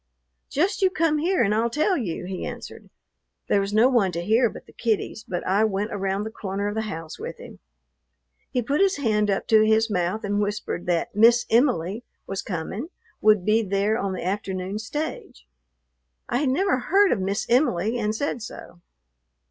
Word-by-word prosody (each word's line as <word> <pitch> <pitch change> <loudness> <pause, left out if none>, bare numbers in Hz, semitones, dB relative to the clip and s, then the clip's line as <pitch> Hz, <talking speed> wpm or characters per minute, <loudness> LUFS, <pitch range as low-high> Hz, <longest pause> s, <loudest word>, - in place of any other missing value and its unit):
"Just 375 +9 0
you 380 - +5
come 325 -4 +1
here 355 -1 +2
and 205 -1 +2
I'll 225 +2 +1
tell 310 - +1
you," 185 - -3
he 185 0 -5
answered. - - -8 0.6
There 200 - +3
was 195 0 -3
no 220 +4 +5
one 235 -8 +2
to 170 +1 -3
hear 230 +3 +3
but - - -11
the - - -18
kiddies, 220 -1 -2
but 175 -3 -4
I 195 +3 +2
went 210 +1 -1
around 195 0 -1
the 220 - -5
corner 200 -1 -3
of 205 - -2
the 220 0 -3
house 165 -4 -7
with 470 - -6
him. - - -12 0.9
He 250 -2 -1
put 280 - 0
his 395 0 +3
hand 215 -6 +1
up 195 - 0
to 220 -1 +6
his 220 +1 +3
mouth 180 +4 -1
and 205 0 0
whispered 205 -4 -3
that 170 -2 0
"Miss 235 +3 +5
Em'ly" 230 - +2 0.2
was 195 0 -4
coming, 190 - -4 0.3
would 210 -4 +4
be 215 +1 +3
there 200 +1 0
on 195 -3 -2
the 185 - -5
afternoon 190 0 -3
stage. 260 - -5 0.8
I - - 0
had 285 -2 +1
never 365 +2 +1
heard 390 +8 +3
of 215 - +1
"Miss 195 +2 -1
Em'ly," 235 - +2
and 215 -1 -1
said 250 -1 -2
so. 180 -4 -10
215 Hz, 190 wpm, -24 LUFS, 195-245 Hz, 0.9 s, to